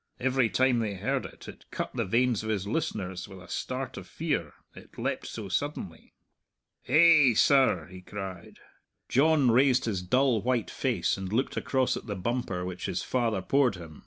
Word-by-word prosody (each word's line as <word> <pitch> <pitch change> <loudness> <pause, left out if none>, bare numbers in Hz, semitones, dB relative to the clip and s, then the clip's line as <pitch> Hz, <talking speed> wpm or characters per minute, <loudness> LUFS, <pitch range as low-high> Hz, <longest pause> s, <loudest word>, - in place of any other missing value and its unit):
Every 130 -2 +2
time 130 0 +2
they 105 -3 -2
heard - - -2
it, - - -15
it - - -11
cut - - -4
the - - -1
veins 120 +3 +1
of 110 - -5
his 100 -3 -1
listeners 100 - -3
with 95 -2 -11
a 90 - -13
start 130 0 -4
of - - -8
fear 145 - -2 0.2
it - - -15
leapt - - -3
so 110 -3 -6
suddenly. 95 - -4 0.7
"Ha'e, 155 -6 +6
sir!" 135 - +4
he 90 +2 -12
cried. 95 -2 -8 0.5
John 140 -1 +4
raised 130 +1 +4
his 100 -5 -1
dull, 125 +4 +2
white 120 -4 -1
face - - 0
and 95 -1 -5
looked 125 +5 0
across 130 -2 0
at - - -8
the 105 - -3
bumper 95 -3 -2
which 90 0 -5
his 90 - -2
father 115 -7 0
poured 130 -2 +2
him. 80 -4 -11
115 Hz, 180 wpm, -28 LUFS, 95-130 Hz, 0.7 s, Ha'e